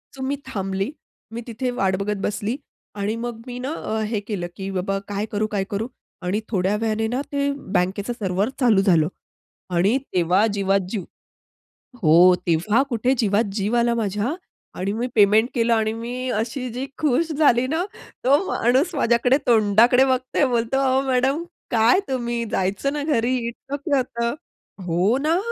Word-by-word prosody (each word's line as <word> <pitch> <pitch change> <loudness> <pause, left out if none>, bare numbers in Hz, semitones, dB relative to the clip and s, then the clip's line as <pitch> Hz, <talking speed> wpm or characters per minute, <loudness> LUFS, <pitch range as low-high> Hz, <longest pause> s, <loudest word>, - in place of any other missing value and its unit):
So 265 - -9
मी 280 - 0
थांबली. 195 -1 -2 0.4
मी 235 - -4
तिथे 240 +2 -3
वाट 195 -6 0
बघत 205 +2 -2
बसली 210 +4 -2 0.4
आणि 205 +2 -2
मग 235 -1 -5
मी 245 0 -6
ना, 270 +5 -3
अ, 220 -8 -3
हे 215 -1 -1
केलं 200 -4 -4
की 195 0 -5
बाबा, 195 +1 -1
काय 205 0 -2
करू? 215 +1 0
काय 205 -2 -1
करू? 210 +3 -2 0.3
आणि 185 +3 -1
थोड्या 195 -1 +1
वेळाने 220 0 0
ना 250 +4 -1
ते, 280 0 0 0.2
बँकेचं 195 +5 0
सर्व्हर 200 -1 -1
चालू 225 -7 +4
झालं 170 -5 +3 0.7
आणि 195 +9 +3 0.2
तेव्हा 180 +4 +3
जीवात 195 0 +2
जीव. 195 -3 -3 1.0
हो, 175 +3 +7
तेव्हा 180 +9 +2
कुठे 245 +1 +1
जीवात 210 0 +2
जीव 215 +3 0
आला 235 0 +2
माझ्या 215 - -1 0.4
आणि 195 +2 -1
मी 235 +3 -2
पेमेंट 215 +2 +5
केलं 235 -1 +2
आणि 220 -1 +1
मी 245 +3 -4
अशी 245 +3 -2
जी 255 +3 -4
खुश 310 +2 +1
झाली 280 -5 +3
ना. 320 +6 -1 0.4
तो 270 +3 +6
माणूस 265 +8 +1
माझ्याकडे 245 -1 +3
तोंडाकडे 235 +3 +5
बघतोय 260 +2 +1
बोलतो, 235 +2 0
"अहो 265 -1 +3
मॅडम, 265 +4 +1 0.3
काय 230 - +4
तुम्ही? 240 -2 -2
जायचं 195 +9 0
ना 295 0 -2
घरी, 255 -4 +1
इतकं 275 +4 -6
काय 280 - +4
होतं. 235 0 -2 0.5
हो 180 +7 +2
ना, 315 +4 +1
230 Hz, 165 wpm, -22 LUFS, 200-255 Hz, 1.0 s, हो